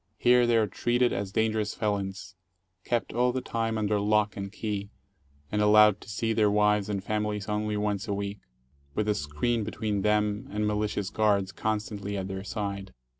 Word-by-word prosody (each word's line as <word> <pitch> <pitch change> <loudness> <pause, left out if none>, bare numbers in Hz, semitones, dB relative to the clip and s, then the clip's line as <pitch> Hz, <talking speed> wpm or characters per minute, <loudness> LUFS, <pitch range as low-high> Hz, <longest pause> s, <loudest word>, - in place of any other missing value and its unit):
Here 125 0 +4
they 120 -1 +4
are 110 - +4
treated 120 +5 +1
as 100 -1 -3
dangerous 110 -1 0
felons, 100 -3 -3 0.5
kept 120 -1 -1
all 125 +2 +2
the 130 - -2
time 115 -2 -2
under 105 -1 +1
lock 105 0 +2
and 100 -1 -5
key, 105 -1 -4 0.6
and 105 - +1
allowed 105 -1 +6
to - - -12
see 110 +4 -1
their 105 -2 +3
wives 105 0 +2
and 100 -2 -2
families 105 -1 -2
only 105 0 -1
once 105 0 -1
a 100 - -1
week, 100 0 -4 0.6
with 105 - 0
a 105 - +3
screen 75 +9 -1
between 105 -1 -2
them 105 0 +1
and 105 +1 -1
malicious 105 -2 -1
guards 100 -3 +2
constantly 105 0 -3
at 95 -1 -3
their 95 0 -5
side. 100 - -4
105 Hz, 175 wpm, -28 LUFS, 100-110 Hz, 0.6 s, allowed